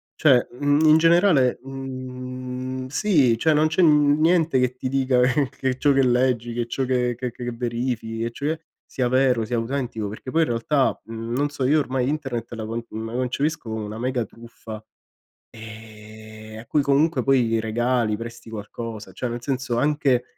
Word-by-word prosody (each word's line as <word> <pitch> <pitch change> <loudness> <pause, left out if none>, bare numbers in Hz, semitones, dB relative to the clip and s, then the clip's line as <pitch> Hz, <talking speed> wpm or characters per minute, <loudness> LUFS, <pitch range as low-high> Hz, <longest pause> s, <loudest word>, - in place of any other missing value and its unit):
Cioè, 135 -6 +4
mhmm, 145 +4 +2
in 155 0 +7
generale, 165 -6 +4
mhmm, 130 -1 -6
sì, 140 - +2
cioè 155 +6 +3
non 155 +1 +3
c'è 160 +4 +1
niente 155 0 +4
che 125 0 0
ti 130 - -3
dica 130 -1 +1
che 130 +2 +2
che 130 -1 -2
ciò 145 +1 +3
che 135 -1 +4
leggi, 120 -2 +1
che 120 0 -2
ciò 130 +2 -2
che 125 -1 0
che 120 -1 -4
verifichi, 115 -1 -3
e 115 - -2
cioè 150 +6 -2 0.3
sia 125 -2 -2
vero, 130 -2 +3
sia 120 +2 -2
autentico, 115 -2 -3
perché 110 +5 -7
poi 165 +3 +3
in - - -1
realtà, 130 +4 +1
mhmm, 115 +1 -6
non 145 +2 +1
so, 145 -2 -3
io 150 +4 +4
ormai 130 -3 -1
internet 135 -6 -3
la 110 -1 -5
con 115 +1 -4 0.2
la 115 - -6
concepisco 130 +2 -2
come 110 -1 -3
una 105 +1 -7
mega 125 0 -1
truffa, 110 -1 -11 0.7
ehm, 110 0 -11
a 115 - -11
cui 150 - +2
comunque 140 +1 +2
poi 120 -4 +2
regali, 115 0 0
presti 115 +1 -9
qualcosa, 110 0 -7
cioè 125 - -4
nel 120 0 -5
senso 130 -2 -2
anche, 140 -3 +2
125 Hz, 175 wpm, -23 LUFS, 115-140 Hz, 0.7 s, in